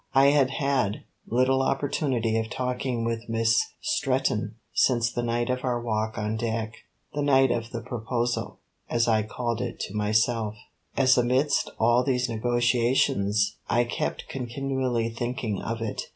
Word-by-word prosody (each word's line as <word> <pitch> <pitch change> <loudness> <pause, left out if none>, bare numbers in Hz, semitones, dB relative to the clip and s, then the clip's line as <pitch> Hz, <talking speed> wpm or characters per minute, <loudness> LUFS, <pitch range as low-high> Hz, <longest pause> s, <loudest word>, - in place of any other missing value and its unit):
I 135 +1 +6
had 140 -3 +3
had 135 -7 0 0.2
little 130 +2 +2
opportunity 135 -4 0
of 110 0 -3
talking 125 -1 -2
with 115 0 -3
Miss 115 0 +3 0.2
Stretton 135 - 0 0.2
since 120 -2 +3
the 120 - -1
night 120 +1 0
of 125 0 -2
our 125 -2 0
walk 110 -1 -2
on 105 0 -2
deck, 110 -1 -2 0.4
the 145 - -1
night 135 -2 +4
of 115 0 -2
the 115 -1 -5
proposal, 120 0 -2 0.3
as 115 0 +2
I 110 -2 +3
called 120 +2 -3
it 125 -2 -4
to 95 - -4
myself, 110 +1 +1 0.4
as 130 -2 +5
amidst 130 +4 +2
all 120 +2 +4
these 125 -1 +1
negotiations 115 -3 +1
I 120 - +3
kept 120 - -3
continually 130 -2 -2
thinking 115 -2 -3
of 115 0 -3
it. 110 - -3
120 Hz, 150 wpm, -26 LUFS, 115-130 Hz, 0.4 s, I